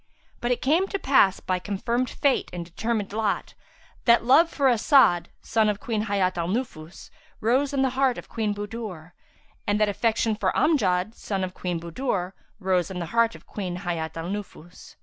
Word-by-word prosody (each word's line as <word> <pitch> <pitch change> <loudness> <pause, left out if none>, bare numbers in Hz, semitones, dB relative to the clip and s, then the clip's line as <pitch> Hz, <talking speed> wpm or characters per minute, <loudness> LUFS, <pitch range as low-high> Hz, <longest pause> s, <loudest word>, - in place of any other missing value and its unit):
But 240 - -2
it 245 - 0
came 330 +8 +3
to 395 - -2
pass, 265 - +3
by 185 -1 -1
confirmed 235 +6 -1
fate 280 -3 +1
and 175 -1 -5
determined 205 +3 -3
lot, 215 -2 -1 0.5
that 235 -1 +5
love 310 +7 +6
for 280 -4 +1
As'ad 240 - +4 0.2
(son 220 -1 +2
of 205 -1 -1
Queen 220 -2 -2
Hayat 190 -4 0
al 170 - -1
Nufus) 185 -6 -5 0.3
rose 260 +6 +2
in 275 -1 +1
the 265 - +1
heart 265 -1 +1
of - - -8
Queen 220 -2 -2
Budur, 205 -6 -6 0.6
and 205 0 +2
that 215 -1 +3
affection 220 +1 +1
for 200 -3 0
Amjad 210 - +2
(son 195 -4 -3
of 185 -1 -4
Queen 180 -3 -3
Budur) 180 +1 -3 0.3
rose 185 -3 +1
in 190 - -6
the 175 - -3
heart 230 0 +3
of - - -14
Queen 185 -4 -5
Hayat 165 -2 -3
al 165 +2 -4
Nufus. 185 -4 -8
210 Hz, 185 wpm, -25 LUFS, 180-240 Hz, 0.6 s, love